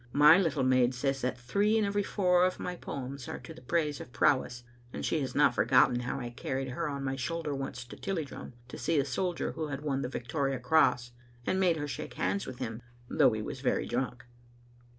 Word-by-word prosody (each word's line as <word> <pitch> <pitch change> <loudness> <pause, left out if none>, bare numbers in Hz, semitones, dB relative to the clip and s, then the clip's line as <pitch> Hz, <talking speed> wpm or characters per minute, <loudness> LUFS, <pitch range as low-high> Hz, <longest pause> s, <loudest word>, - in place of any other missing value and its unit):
My 150 +4 +8
little 155 -7 +1
maid 130 -1 +3
says 135 +1 -1
that 130 0 -1
three 200 - +1
in 215 - +2
every 205 +1 0
four 180 -3 +2
of 185 0 +1
my 180 - -4
poems 135 -4 -6
are - - -4
to 165 - -10
the 165 - -14
praise 155 -4 -1
of 125 - -10
prow 130 +2 +4
ess, 120 -1 -9 0.3
and - - -4
she 160 - +1
has 135 - -4
not 140 -3 +5
forgotten 125 +2 +4
how 125 +2 -3
I 120 -2 -5
carried 130 +2 -3
her 150 +5 -2
on 140 -1 -4
my 135 0 -1
shoulder 150 +3 -3
once 135 -2 -5
to - - -10
Tilliedrum 165 -10 -5 0.2
to - - -7
see 165 - +1
a 140 - +3
soldier 175 +6 -1
who 155 - -4
had 140 -1 -5
won 140 -3 -1
the 125 - -3
Victoria 135 +2 -2
Cross, 125 -3 +3 0.3
and 190 - +1
made 180 -4 +3
her 145 -1 -3
shake 140 - -6
hands 200 - -1
with 130 - -7
him, 115 0 -5 0.3
though 120 - +5
he 110 -1 -3
was 130 +3 -6
very 130 - +1
drunk. 125 0 -3
140 Hz, 225 wpm, -30 LUFS, 125-165 Hz, 0.3 s, My